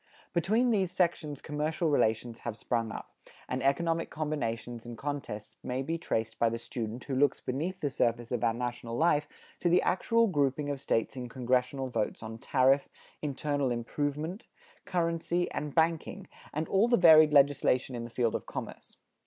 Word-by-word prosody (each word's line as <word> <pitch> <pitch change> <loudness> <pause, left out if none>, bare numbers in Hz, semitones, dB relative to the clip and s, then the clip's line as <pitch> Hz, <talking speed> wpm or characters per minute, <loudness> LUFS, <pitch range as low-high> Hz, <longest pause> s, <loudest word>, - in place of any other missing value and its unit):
Between 220 +8 +2
these 190 -5 +1
sections 170 -5 -1
commercial 155 +3 -1
relations 115 -4 +1
have 115 -2 -5
sprung 115 -2 -1
up, - - -8 0.3
and 130 +1 -2
economic 165 +4 +1
combinations 120 -6 -3
and 120 -1 -8
contests 140 -7 -5
may 125 +1 -2
be 165 +4 -2
traced 115 -9 -2
by 115 - +4
the 115 - -3
student 115 0 -5
who 140 - -5
looks 140 +2 +3
beneath 165 +9 -3
the 145 - 0
surface 120 -2 0
of 120 -3 -1
our 115 - +2
national 120 -1 -4
life 155 -2 +3 0.3
to 175 - +1
the 175 +2 +4
actual 230 +5 +3
grouping 145 - 0
of 140 -2 -5
States 115 +1 0
in 125 -2 -5
congressional 125 +2 0
votes 110 -2 -2
on 110 +1 -7
tariff, 135 +1 +3 0.3
internal 145 -1 -1
improvement, 145 - -3 0.4
currency 170 0 0
and 150 -1 -4
banking, 165 0 +1 0.2
and 155 +2 -2
all 200 +4 +3
the 240 0 +4
varied 155 -3 +8
legislation 140 -2 +3
in 120 -1 -4
the 120 - -7
field 115 -1 0
of - - -4
commerce. - - -7
140 Hz, 170 wpm, -30 LUFS, 120-165 Hz, 0.4 s, varied